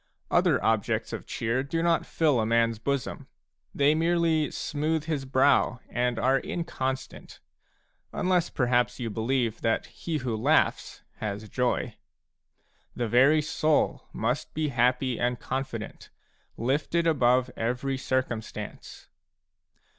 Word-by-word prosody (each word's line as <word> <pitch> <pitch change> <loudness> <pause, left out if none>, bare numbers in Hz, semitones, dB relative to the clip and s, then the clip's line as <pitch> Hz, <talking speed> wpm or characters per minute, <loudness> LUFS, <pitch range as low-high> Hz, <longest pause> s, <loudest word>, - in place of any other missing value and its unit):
Other - - +3
objects 110 -2 0
of - - -6
cheer 115 +3 -1
do 165 +5 -2
not 170 -1 +2
fill 150 -6 +2
a 110 - +1
man's 115 -1 +2
bosom; 140 +2 -3 0.4
they 145 +1 +3
merely 165 -1 +2
smooth 155 +1 -2
his 155 -4 -2
brow 130 -1 +3
and 125 -1 0
are 135 +3 +3
inconstant, 135 -7 -4 0.4
— - - -44
unless 180 -1 +1
perhaps 125 -1 +1
you 115 -3 -3
believe 115 +1 -1
that 115 -1 +1
he 165 -2 -4
who 125 -5 -2
laughs 140 +9 +1
has 105 0 -4
joy. 125 -1 -1 1.0
The 120 - -1
very 135 +7 +5
soul 155 0 +1
must 120 +5 -2
be 155 -1 0
happy 125 0 +1
and 120 0 0
confident, 130 -5 -5 0.5
lifted 145 +7 0
above 125 -5 +3
every 125 +4 -2
circumstance. 130 -4 -4
130 Hz, 125 wpm, -27 LUFS, 120-150 Hz, 1.0 s, very